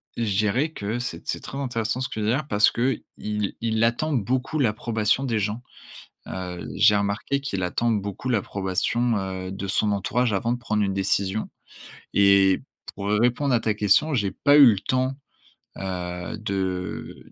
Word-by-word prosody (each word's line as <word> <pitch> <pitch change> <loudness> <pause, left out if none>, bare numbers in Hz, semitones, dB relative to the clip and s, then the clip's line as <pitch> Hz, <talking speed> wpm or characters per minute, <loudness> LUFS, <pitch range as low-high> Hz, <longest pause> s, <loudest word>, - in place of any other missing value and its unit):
je 105 -5 -1
dirais 110 +9 +1
que 105 +1 -3
c'est 125 - -6
c'est - - -2
très 135 - -8
intéressant 120 -4 -2
ce 130 - -1
qu'il 105 -1 -3
y - - +3
a 135 +5 0
parce 105 -6 +3
qu'il 125 +3 -1
il 105 +2 -2
attend 120 +7 +1
beaucoup 130 +5 -1
l'approbation 115 0 +1
des 115 -5 0
gens, 105 +4 -2 0.6
heu, 90 -1 -5
j'ai 105 +1 +5
remarqué 100 +7 -1
qu'il 100 -9 -3
attend 115 +6 0
beaucoup 105 +3 -3
l'approbation, 105 +2 0
heu, 95 -1 -4
de 95 0 -5
son 105 +2 +1
entourage, 115 +5 0
avant 105 +4 0
de - - -3
prendre 110 -3 -1
une 100 -1 0
décision 95 +1 0 0.6
et 100 -1 +5 0.3
pour 100 0 -4
répondre 120 +6 +2
à 120 - +4
ta 110 -1 0
question, 105 +9 +3
j'ai 100 -6 +1
pas 145 +9 +3
eu 145 -2 +10
le - - -3
temps, 130 +5 -1 0.6
heu, 90 -2 -4
de 95 -3 -4
105 Hz, 165 wpm, -24 LUFS, 100-120 Hz, 0.6 s, eu